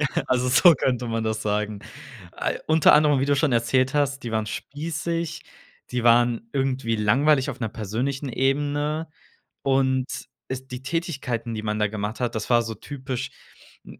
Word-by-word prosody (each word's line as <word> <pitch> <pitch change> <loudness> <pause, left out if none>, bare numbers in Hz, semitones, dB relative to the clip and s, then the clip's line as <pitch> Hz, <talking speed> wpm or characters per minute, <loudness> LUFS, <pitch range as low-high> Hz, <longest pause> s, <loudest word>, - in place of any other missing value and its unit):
Ja, - - +1
also, 125 0 +1
so 170 +7 +7
könnte 125 -2 -1
man 115 0 -1
das 110 0 -1
sagen. 105 0 -1 0.5
Ei - - -2
unter 160 0 +6
anderem, 150 -2 +5
wie 135 - +1
du 145 0 +2
schon 145 0 +2
erzählt 130 +3 +2
hast, 140 -1 0
die 120 - -4
waren 110 -1 0
spießig, 160 +6 -4 0.5
die 125 -1 -1
waren 120 0 +4
irgendwie 130 -4 0
langweilig, 130 +6 +3
auf - - -6
'ner 115 - -1
persönlichen 125 +6 -3
Ebene. 145 +4 0 0.5
Und 130 -1 +2 0.4
es 130 0 -5
die 125 +1 -7
Tätigkeiten, 135 -7 -3
die 110 - -5
man 105 0 -1
da 105 - +3
gemacht 105 +1 -4
hat, 120 -1 -1
das 110 - -3
war 120 -1 +5
so 115 -1 -5
typisch, 130 -1 -5 0.5
m - - -13
130 Hz, 170 wpm, -24 LUFS, 115-145 Hz, 0.5 s, so